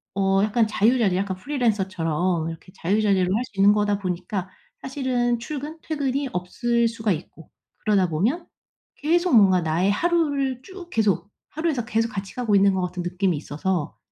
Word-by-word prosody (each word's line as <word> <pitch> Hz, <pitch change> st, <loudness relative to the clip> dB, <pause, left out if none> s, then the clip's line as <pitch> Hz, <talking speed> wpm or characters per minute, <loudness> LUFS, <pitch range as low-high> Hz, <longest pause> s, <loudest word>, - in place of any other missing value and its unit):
어 195 Hz, 0 st, +2 dB
약간 220 Hz, +1 st, +2 dB
자유자재 215 Hz, -1 st, +2 dB
약간 190 Hz, -1 st, -2 dB
프리랜서처럼 185 Hz, -, 0 dB
이렇게 165 Hz, +3 st, -10 dB
자유자재로 195 Hz, -1 st, +1 dB
할 235 Hz, -, 0 dB
수 230 Hz, -, -20 dB
있는 200 Hz, +1 st, +7 dB
거다 205 Hz, -1 st, +1 dB
보니까 185 Hz, 0 st, -3 dB, 0.4 s
사실은 255 Hz, -3 st, 0 dB
출근 295 Hz, +5 st, -6 dB
퇴근이 280 Hz, -3 st, -2 dB
없을 235 Hz, +6 st, 0 dB
수가 225 Hz, -2 st, -1 dB
있고 160 Hz, -1 st, -9 dB, 0.3 s
그러다 200 Hz, -4 st, +2 dB
보면 230 Hz, -, 0 dB, 0.5 s
계속 340 Hz, -1 st, +2 dB
뭔가 190 Hz, -4 st, +6 dB
나의 165 Hz, +4 st, +1 dB
하루를 285 Hz, -2 st, 0 dB
쭉 375 Hz, 0 st, -11 dB
계속 210 Hz, -2 st, +1 dB, 0.2 s
하루에서 305 Hz, -7 st, -1 dB
계속 225 Hz, -1 st, 0 dB
같이 195 Hz, -4 st, -6 dB
가고 235 Hz, -5 st, +1 dB
있는 195 Hz, 0 st, +5 dB
것 190 Hz, -, 0 dB
같은 180 Hz, 0 st, -3 dB
느낌이 180 Hz, 0 st, 0 dB
있어서 155 Hz, +2 st, -3 dB
210 Hz, 355 characters per minute, -24 LUFS, 185-255 Hz, 0.5 s, 있는